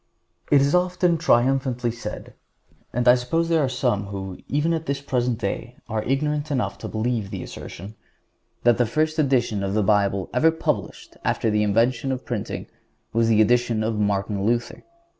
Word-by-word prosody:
It 145 -2 +5
is 140 +1 +2
often 180 -1 +2
triumphantly 130 -4 +2
said, 110 -2 -7 0.6
and 125 +1 -1
I 125 - +9
suppose 145 +7 0
there 165 -2 +3
are 135 - +1
some 120 -6 0
who, 95 -2 -6
even 150 +4 +1
at 160 -1 -3
the 140 - +1
present 125 -4 -1
day, 120 +1 -4
are 110 -1 -2
ignorant 150 +4 -1
enough 135 -4 -1
to - - -5
believe 110 -2 -2
the - - -5
assertion, 95 +5 -9 0.7
that 120 -1 +4
the 120 - +3
first 155 +6 0
edition 125 -8 +1
of 100 +1 -2
the 110 - +2
Bible 100 -2 +1
ever 125 +6 +4
published 160 0 -3
after 110 - 0
the 105 0 +2
invention 115 +5 +1
of 130 -1 -4
printing 115 -5 -4 0.5
was 115 0 +2
the 110 -1 +5
edition 120 -1 +2
of 110 -1 -1
Martin 100 -1 0
Luther. 120 +2 -1
120 Hz, 175 wpm, -23 LUFS, 110-140 Hz, 0.7 s, I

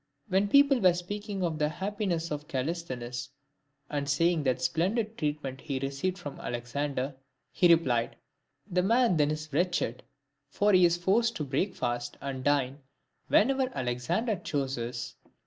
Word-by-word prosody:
When 195 +2 +3
people 280 +3 +5
were 185 -4 +5
speaking 205 +2 -4
of 160 -3 -1
the 150 0 +2
happiness 185 -2 -2
of 150 0 -4
Calisthenes, 130 -4 -3 0.6
and 145 -1 -3
saying 165 +2 +2
what 130 -1 +1
splendid 205 - 0
treatment 145 -5 -3
he 140 -3 -3
received 140 +8 -2
from 145 -7 -8
Alexander, 130 +3 -3 0.4
he 175 -1 +4
replied, 125 -9 +2 0.3
" - - -46
The 180 +1 +3
man 230 -1 +3
then 150 -1 +3
is 155 0 -4
wretched, 170 -7 0 0.5
for 205 +7 +2
he 185 -1 +7
is 170 0 +3
forced 225 +7 +2
to 150 - -2
breakfast 130 -5 -2
and 135 -2 -5
dine 140 -1 +1 0.5
whenever 265 +3 +3
Alexander 130 - -1
chooses." 125 -6 -3
155 Hz, 145 wpm, -29 LUFS, 135-190 Hz, 0.6 s, he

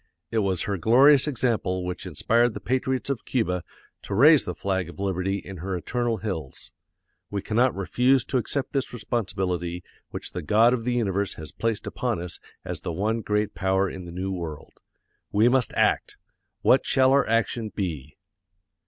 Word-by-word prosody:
It 115 - +1
was 95 -5 0
her 100 -2 -2
glorious 135 - +6
example 115 -9 0
which 90 0 -5
inspired 120 0 +2
the - - -4
patriots 130 +3 -1
of 130 - -4
Cuba 90 -9 -1 0.4
to - - -4
raise 145 +6 +6
the 90 - -4
flag 95 -3 -2
of 85 - -12
liberty 95 0 -1
in 95 -1 -8
her 90 +2 -3
eternal 120 +5 -1
hills. 90 -9 -6 0.6
We 100 -1 -3
cannot 120 +4 +2
refuse 125 +6 +2
to 130 - 0
accept 135 +3 -3
this 135 -3 -1
responsibility 95 -6 -2 0.3
which - - -5
the 90 - -4
God 110 +9 +4
of 115 -3 -2
the 125 - 0
universe 100 -4 0
has 80 -3 -8
placed 115 -2 -2
upon 120 -7 -2
us 90 -1 -6 0.3
as - - -5
the - - -4
one 110 +7 -1
great 105 0 -1
power 95 0 +1
in 95 -1 -7
the 85 - -8
New 95 +2 -3
World. 85 -5 -6 0.6
We 105 +3 +4
must 125 -1 +2
act! - - +1 0.5
What - - +5
shall 130 0 +3
our 135 -4 +3
action 115 0 0
be? 75 -9 -5
105 Hz, 175 wpm, -25 LUFS, 90-120 Hz, 0.6 s, glorious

